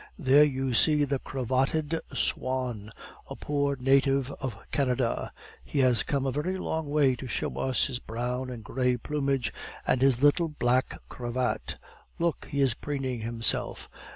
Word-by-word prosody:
"There 145 -3 +6
you 135 -3 0
see 150 +5 +4
the 140 -1 0
cravatted 135 +6 -1
swan, 125 -6 -1 0.4
a - - -6
poor 145 -1 -1
native 135 +1 +3
of 130 -7 -4
Canada; 125 -3 0 0.3
he - - -6
has 125 -4 +5
come 140 -2 -1
a 135 - 0
very 170 +7 -2
long 160 -4 -3
way 145 -3 +3
to 130 - -7
show 105 -6 -3
us 130 -1 +2
his 125 -3 -3
brown 125 +3 -3
and 120 -3 -7
gray 125 +1 0
plumage 140 -1 -1 0.3
and 125 - +1
his 135 -1 +3
little 155 +4 +4
black 130 -3 0
cravat! 125 +1 -3 0.4
Look, 170 -2 -1
he 140 -1 -1
is 135 -4 +3
preening 135 -2 -3
himself. 115 +1 -1
130 Hz, 155 wpm, -28 LUFS, 125-145 Hz, 0.4 s, There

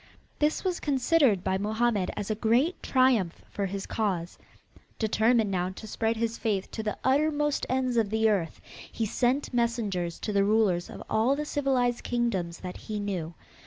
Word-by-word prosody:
This 300 +1 +1
was 365 -3 -1
considered 265 - +2
by 190 - 0
Mohammed 215 -1 0
as 205 +1 -3
a 215 - -4
great 245 +10 +2
triumph 255 -10 +2
for 200 -1 -2
his 195 +1 -4
cause. 185 -6 -2 0.6
Determined 220 0 +2
now 180 -1 0
to 190 +4 -9
spread 225 +1 -1
his 230 0 -2
faith 205 -4 -1
to 220 - -4
the 215 -1 -3
uttermost 295 +1 +1
ends 255 -2 0
of 220 -3 +2
the 220 +1 +2
earth, 190 -7 0 0.3
he 225 - -2
sent 250 +6 0
messengers 215 -8 -1
to 210 - -3
the 200 0 +3
rulers 200 -4 +2
of - - -8
all 230 +5 +2
the 300 +1 -3
civilized 260 -5 0
kingdoms 195 -9 -1
that 180 -1 -6
he 215 -1 -5
knew. 180 -5 -3
220 Hz, 170 wpm, -28 LUFS, 195-250 Hz, 0.6 s, the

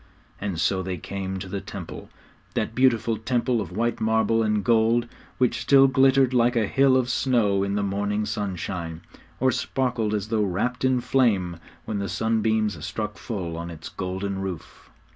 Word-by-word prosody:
And 100 -5 -3
so 95 +2 +1
they 95 -1 -4
came 95 +2 -5
to 95 +1 -6
the 100 +1 -4
Temple 100 -3 -8 0.5
that - - -1
beautiful 115 -3 +2
Temple 120 +1 0
of 90 -4 -6
white 115 +5 -1
marble 110 0 +2
and 105 -2 +1
gold, 115 +1 +3 0.3
which 125 -1 +1
still 135 +2 +6
glittered 135 0 +4
like 120 0 +3
a 115 -2 +2
hill 135 +4 +4
of 125 -2 +1
snow 110 -5 +2
in 100 0 -1
the 105 - 0
morning 100 +2 -1
sunshine, 90 -5 -4 0.4
or 130 +1 +3
sparkled 125 -4 -1
as 105 +1 -3
though 110 -1 +1
wrapped 105 +7 -1
in 130 -1 +2
flame 110 -9 +1 0.3
when 105 -2 -3
the 100 -1 -3
sunbeams 110 +1 0
struck 105 +1 -4
full 90 -8 -4
on 85 +1 -5
its 80 -2 -8
golden 95 +1 -4
roof. 95 -4 -7
110 Hz, 170 wpm, -25 LUFS, 95-120 Hz, 0.5 s, still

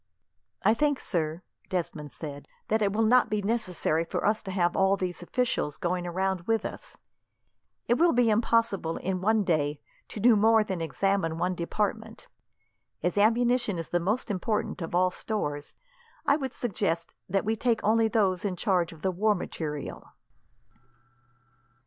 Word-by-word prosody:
"I 215 - +5
think, 290 +3 +1
sir," 165 -1 -2 0.3
Desmond 165 -5 -3
said, 145 -3 -8 0.2
"that 220 +1 +2
it 200 -1 +2
will 220 +3 +1
not 245 +3 +4
be 210 -1 -1
necessary 185 -7 0
for 165 - -3
us 215 +1 +2
to - - -8
have 175 -2 +1
all 195 +1 +3
these 180 -2 -3
officials 205 - -1
going 175 0 -1
round 190 0 -1
with 225 -1 +1
us. - - -7 0.9
It 240 - +2
will 340 0 +5
be 240 -2 +3
impossible, 215 -6 +1
in 185 -1 -2
one 215 +2 +3
day, 150 -5 0 0.3
to - - -8
do 230 +2 +6
more 220 +1 +5
than 190 -5 -4
examine 165 +2 0
one 180 +2 0
department. 180 +4 -3 0.8
As 180 - 0
ammunition 235 0 +2
is 165 - -5
the 175 - +1
most 210 +7 -1
important 205 +1 -2
of 165 +1 -4
all 185 +1 +3
stores, 145 -10 -4 0.5
I 280 - +4
would 270 -4 -3
suggest 180 -9 -2 0.2
that 195 +2 0
we 220 +1 +1
take 230 0 0
only 225 +1 +3
those 195 -5 +1
in 195 -3 -1
charge 180 -3 +1
of 160 -2 -14
the 190 - +1
war 210 +4 +2
material." 150 -5 -6
195 Hz, 160 wpm, -28 LUFS, 175-220 Hz, 0.9 s, do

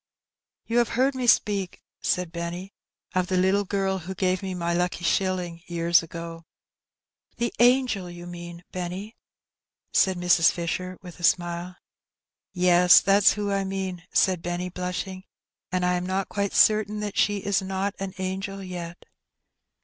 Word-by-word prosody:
'* - - -66
"You 235 +1 +1
have 235 - +2
heard 265 +2 +3
me 255 -2 -3
speak," 200 -5 +2 0.2
said 180 -2 0
Benny, 170 +3 -5 0.4
"of 185 -1 +1
the 185 - 0
little 190 +2 +2
girl 195 -1 -1
who 185 +3 -7
gave 185 -1 0
me 190 -2 -4
my 170 -1 -1
lucky 175 0 -1
shilling 180 -2 0
years 170 0 +3
ago? 165 0 -8 0.4
*' - - -47
"The 235 - -1
angel, 240 -6 +3
you 175 0 -9
mean, 175 0 -9
Benny,'' 185 +4 -5 0.8
said 190 -1 +3
Mrs. 175 -1 +4
Fisher, 180 +1 -4
with 180 -1 -11
a - - -10
smile. 175 +1 +1 0.8
"Yes, 180 -1 +6
that's 200 +1 +4
who 205 -1 -2
I 195 0 +1
mean," 190 -2 -4
said 185 -3 +2
Benny, 175 +1 -3
blushing; 180 +1 -4 0.5
"and 180 0 0
I 180 - +2
am 180 0 -1
not 190 +1 -1
quite 200 -1 -2
certain 215 -1 +4
that 205 -1 -4
she 205 0 +2
is 200 0 0
not 195 +1 -2
an 195 -1 -5
angel 195 +1 -4
yet." 175 -2 -7
185 Hz, 160 wpm, -25 LUFS, 175-195 Hz, 0.8 s, Yes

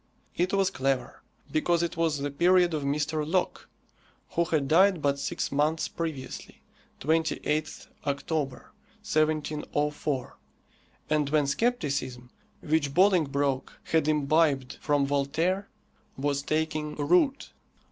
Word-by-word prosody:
It 180 +1 0
was 195 -1 +2
clever. 135 0 -2 0.3
Because 170 +2 +1
it 170 - -2
was 165 -2 +1
the 140 0 -3
period 175 +3 +4
of 155 - -1
Mr. 150 +2 -1
Locke, 175 +4 -1 0.6
who 170 - +1
had 155 -4 0
died 185 +4 +5
but 140 -1 0
six - - -3
months 150 +3 +1
previously 155 -6 -6 0.4
28th 160 0 -1 0.2
October, 140 -1 -2 0.3
1704 150 -3 -1 0.7
and 150 -2 +2
when 150 -1 +2
scepticism, 140 - -1 0.3
which 150 -3 0
Bolingbroke 145 -8 +2
had 160 -2 +1
imbibed 150 -3 +2
from 145 -1 +2
Voltaire, 160 +8 0 0.5
was 140 +1 0
taking 155 0 -2
root. 180 - +2
150 Hz, 110 wpm, -28 LUFS, 140-165 Hz, 0.7 s, died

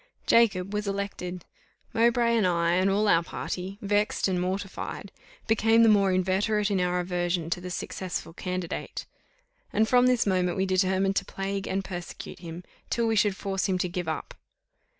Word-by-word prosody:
Jacob 200 -4 +3
was 210 0 -2
elected. 195 -3 -4 0.5
Mowbray 235 0 +3
and 215 -5 +3
I, 170 -1 +2
and 185 +2 +3
all 205 +2 +2
our 165 -4 +5
party, 185 +3 -5
vexed 205 +1 +1
and 180 -2 0
mortified, 190 +1 -4 0.3
became 225 +1 +4
the 225 - +6
more 200 -2 +4
inveterate 195 +3 +1
in 190 -2 +1
our 180 0 +1
aversion 175 -2 -1
to 180 - -1
the 180 - -6
successful 175 -1 -4
candidate; 180 -1 -4 0.7
and 220 +2 +2
from 250 +2 +5
this 250 -2 +3
moment 185 -2 +1
we 190 - +1
determined 190 +1 +1
to 200 - 0
plague 195 +1 -4
and 195 0 -2
persecute 175 -3 -7
him, 170 0 -8 0.3
till 235 - +1
we 225 0 +1
should 205 -2 +3
force 195 -1 -1
him 185 - +2
to 180 - 0
give 180 -1 -4
up. 160 - -4
190 Hz, 170 wpm, -27 LUFS, 180-205 Hz, 0.7 s, the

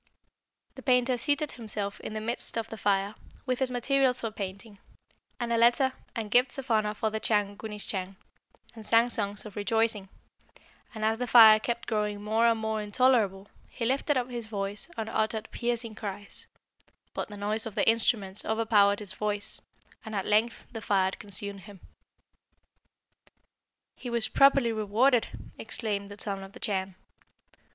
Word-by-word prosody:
The - - -11
painter 250 -1 +3
seated 290 +4 0
himself 210 -3 -5
in 215 - -7
the 215 - -3
midst 230 +1 +1
of 225 0 -3
the 225 - -7
fire, 200 0 +1 0.3
with 255 -2 -1
his 265 -1 +1
materials 255 +1 +1
for 225 - -3
painting, 200 0 -7 0.6
and 235 -1 -1
a - - +2
letter 245 +3 +4 0.2
and 220 -3 -4
gifts 250 +4 +3
of 270 -2 -5
honour 215 -1 +2
for 220 +1 -1
the 220 - -2
Chan 205 -2 0
Gunisschang, 200 -3 -5 0.6
and 225 - -10
sang 230 +2 +4
songs 205 -3 -2
of 210 - -10
rejoicing; 215 -1 +1 0.9
and 215 0 -2
as 220 +1 +1
the 250 - -2
fire 220 -2 +9
kept 235 +1 -3
growing 210 -2 -1
more 220 +2 +2
and 230 -1 +2
more 220 0 -2
intolerable, 210 -3 +2 0.2
he 235 - -4
lifted 275 +3 +1
up 250 0 -2
his 235 -2 -5
voice 205 +4 -4
and 220 -1 -3
uttered 220 0 -1
piercing 235 -2 -2
cries; 205 -2 -7 0.7
but - - -3
the 205 - -9
noise 210 +2 -1
of 215 - -8
the - - +1
instruments 215 -3 +1
overpowered 215 -2 +3
his 200 -3 -6
voice, 205 0 -4 0.4
and 220 -1 -6
at 195 - -1
length 215 +3 +1
the 225 - -6
fire 190 -2 +2
consumed 200 0 -4
him." 200 0 -13 2.2
"He 245 - -7
was 235 -2 +1
properly 275 -3 +5
rewarded!" 225 +4 +2 0.3
exclaimed 200 -3 -3
the 205 0 -11
Son 195 -2 -2
of 195 +1 -12
the 250 - -12
Chan. 190 -3 -2
220 Hz, 165 wpm, -28 LUFS, 205-235 Hz, 2.2 s, fire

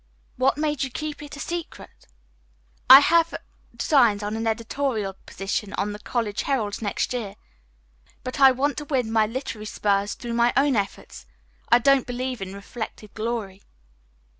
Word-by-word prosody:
"What 265 +2 +2
made 300 -3 -1
you 270 - 0
keep 300 +4 -5
it 290 -1 -9
a - - -10
secret?" 340 +1 -7 0.8
"I 265 +2 +12
have 335 +2 +3 0.4
designs 235 -8 +3
on 210 +1 -3
an 225 0 -2
editorial 225 -2 -2
position 195 +1 -3
on 205 +1 -2
the 205 - -7
'College 215 -2 -2
Herald' 225 -8 -2
next 205 +3 -1
year. 215 -5 -4 0.9
But 255 +2 -5
I 270 -1 +9
want 270 +2 0
to 295 - -4
win 255 -6 -1
my 220 -1 +3
literary 225 -3 -5
spurs 200 -1 0
through 235 -1 -6
my 235 +1 +3
own 275 -1 +3
efforts. 70 - -4 0.4
I - - +7
don't 270 +1 +3
believe 250 -1 -4
in 195 0 -6
reflected 215 +1 -8
glory." 215 -4 -4
235 Hz, 160 wpm, -24 LUFS, 210-270 Hz, 0.9 s, I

